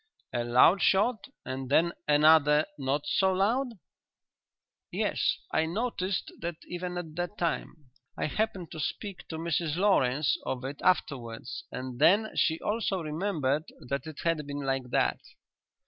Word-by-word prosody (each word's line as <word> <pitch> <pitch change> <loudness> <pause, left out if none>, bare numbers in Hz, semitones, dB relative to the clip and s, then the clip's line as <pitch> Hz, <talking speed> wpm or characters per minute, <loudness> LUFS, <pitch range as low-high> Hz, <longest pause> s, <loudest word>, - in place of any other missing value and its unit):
"A 120 - 0
loud 125 +11 +5
shot 210 +4 +2 0.2
and 130 0 -5
then 170 +4 +3
another 150 0 +5
not 140 +2 -1
so 190 -1 +2
loud?" 235 +7 +1 1.2
"Yes; - - 0
I 160 - +2
noticed 195 0 -2
that 170 0 -3
even 180 0 -4
at 160 -3 -6
the 175 +1 -1
time. 165 -6 -4 0.3
I - - -1
happened 190 0 -2
to 160 - -7
speak 195 +5 -4
to 160 - -5
Mrs 165 -1 -1
Lawrence 150 -8 +2
of 130 0 -3
it 140 +2 -6
afterwards 125 -10 -1
and 130 -1 -6
then 205 +8 +5
she 160 -1 +2
also 205 -4 -1
remembered 155 -3 -1 0.2
that 140 +1 -2
it 155 -2 -8
had 165 -3 0
been 145 0 -4
like 135 -2 -2
that." - - +1
160 Hz, 145 wpm, -29 LUFS, 140-185 Hz, 1.2 s, loud